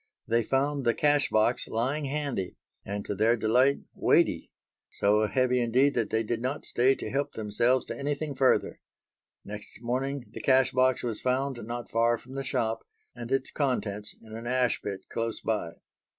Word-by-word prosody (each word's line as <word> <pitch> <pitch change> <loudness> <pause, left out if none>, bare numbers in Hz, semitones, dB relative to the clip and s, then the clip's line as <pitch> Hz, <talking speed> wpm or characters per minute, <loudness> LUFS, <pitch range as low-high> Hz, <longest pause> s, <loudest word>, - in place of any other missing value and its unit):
They 115 +1 +3
found 135 +4 0
the 120 -1 +2
cash 145 -1 +3
box 110 +3 +2
lying 135 +7 -1
handy, 140 -9 -3 0.3
and, 100 0 -4
to - - -2
their 110 +4 +3
delight, 125 +6 +3
weighty; - - +2 0.4
so 105 +1 +3
heavy 125 +1 +2
indeed 130 +4 +3
that 115 -3 0
they 110 0 +1
did 115 +1 -2
not 130 +4 -3
stay 130 +3 +3
to - - -5
help 140 +1 -1
themselves 120 +4 +1
to - - -5
anything 145 +1 -2
further. 130 -1 +2 0.6
Next 105 0 -8
morning 130 +3 -2
the - - -7
cash 130 -1 +4
box 130 0 +2
was 115 -3 -3
found 130 +1 0
not 120 0 -5
far 115 +1 +3
from 130 +3 -14
the 135 0 -3
shop 115 -4 -1 0.3
and 120 0 -8
its 135 -1 0
contents 105 -7 -2
in 110 -1 -12
an 115 +1 -6
ash 125 -2 +1
pit 100 -2 -5
close 115 -1 -3
by. 105 -7 -2
120 Hz, 175 wpm, -28 LUFS, 110-135 Hz, 0.6 s, cash